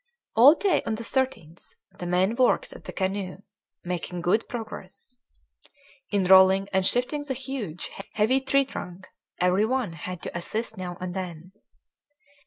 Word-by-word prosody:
All 260 Hz, +8 st, +8 dB
day 395 Hz, 0 st, +2 dB
on 220 Hz, -, 0 dB
the 230 Hz, -, -6 dB
13th 225 Hz, -, -3 dB, 0.2 s
the 175 Hz, -, -4 dB
men 185 Hz, +4 st, +2 dB
worked 260 Hz, -, +2 dB
at -, -, -13 dB
the -, -, -6 dB
canoe, 190 Hz, 0 st, -3 dB, 0.4 s
making 180 Hz, 0 st, -4 dB
good 185 Hz, +6 st, +1 dB
progress. 225 Hz, 0 st, -8 dB, 0.9 s
In 200 Hz, -2 st, +1 dB
rolling 190 Hz, +1 st, +6 dB
and 190 Hz, 0 st, +3 dB
shifting 250 Hz, +9 st, +1 dB
the 280 Hz, -2 st, -3 dB
huge, 250 Hz, -, -5 dB, 0.2 s
heavy 230 Hz, +5 st, +2 dB
tree 275 Hz, +1 st, +2 dB
trunk 185 Hz, -7 st, -8 dB, 0.3 s
every 180 Hz, +4 st, +3 dB
one 250 Hz, -7 st, -1 dB
had 165 Hz, +3 st, -7 dB
to -, -, -6 dB
assist 215 Hz, +7 st, -3 dB
now 180 Hz, -2 st, -6 dB
and 180 Hz, -1 st, -4 dB
then. 180 Hz, -2 st, -6 dB
195 Hz, 150 wpm, -26 LUFS, 180-250 Hz, 0.9 s, All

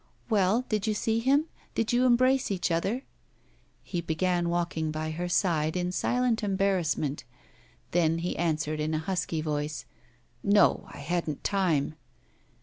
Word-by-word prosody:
'Well, 210 Hz, +4 st, +3 dB
did 215 Hz, -1 st, -1 dB
you 215 Hz, -, +1 dB
see 225 Hz, +2 st, 0 dB
him? 275 Hz, +6 st, +3 dB, 0.3 s
did 225 Hz, +1 st, 0 dB
you 250 Hz, +1 st, +4 dB
embrace 255 Hz, +2 st, +3 dB
each 185 Hz, -3 st, -1 dB
other?' 195 Hz, +10 st, 0 dB, 0.8 s
He 175 Hz, -3 st, -3 dB
began 175 Hz, +1 st, 0 dB
walking 170 Hz, -2 st, -1 dB
by 155 Hz, +1 st, -3 dB
her 175 Hz, +3 st, -3 dB
side 165 Hz, -3 st, +1 dB
in 180 Hz, 0 st, -1 dB
silent 245 Hz, +4 st, +1 dB
embarrassment. 190 Hz, -7 st, 0 dB, 0.7 s
Then 165 Hz, -1 st, +2 dB
he 170 Hz, +2 st, -2 dB
answered 155 Hz, -2 st, -1 dB
in 155 Hz, +1 st, -1 dB
a 155 Hz, 0 st, -3 dB
husky 175 Hz, -4 st, -1 dB
voice: 150 Hz, -1 st, -3 dB, 0.6 s
'No; 205 Hz, 0 st, +4 dB
I -, -, -10 dB
hadn't 155 Hz, 0 st, -2 dB
time. 170 Hz, -8 st, +1 dB
175 Hz, 145 wpm, -28 LUFS, 155-210 Hz, 0.8 s, you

